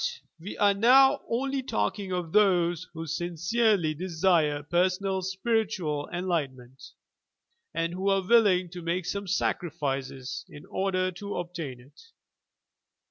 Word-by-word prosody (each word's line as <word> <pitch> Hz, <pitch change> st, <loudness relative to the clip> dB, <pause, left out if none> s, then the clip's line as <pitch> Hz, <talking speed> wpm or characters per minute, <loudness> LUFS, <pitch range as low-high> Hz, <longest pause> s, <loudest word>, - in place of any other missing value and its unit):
But -, -, -17 dB
we 200 Hz, -, -7 dB
are 205 Hz, -1 st, +4 dB
now 265 Hz, +7 st, +6 dB
only 270 Hz, +3 st, -1 dB
talking 185 Hz, -, -2 dB
of 175 Hz, -3 st, -3 dB
those 180 Hz, -3 st, +3 dB
who 165 Hz, 0 st, -5 dB
sincerely 175 Hz, +3 st, +1 dB
desire 160 Hz, -3 st, +1 dB
personal 185 Hz, +4 st, 0 dB
spiritual 190 Hz, -6 st, -1 dB
enlightenment, 140 Hz, -8 st, -3 dB, 0.9 s
and 165 Hz, +1 st, -2 dB
who 190 Hz, +2 st, -1 dB
are 195 Hz, -1 st, +1 dB
willing 195 Hz, -6 st, +4 dB
to 180 Hz, -1 st, -7 dB
make 170 Hz, +1 st, -2 dB
some 200 Hz, +2 st, -3 dB
sacrifices 140 Hz, -8 st, -2 dB
in 145 Hz, -, -12 dB
order 185 Hz, -1 st, -1 dB
to 200 Hz, +3 st, -6 dB
obtain 170 Hz, -7 st, -5 dB
it. 130 Hz, +4 st, -18 dB
180 Hz, 125 wpm, -27 LUFS, 160-200 Hz, 0.9 s, now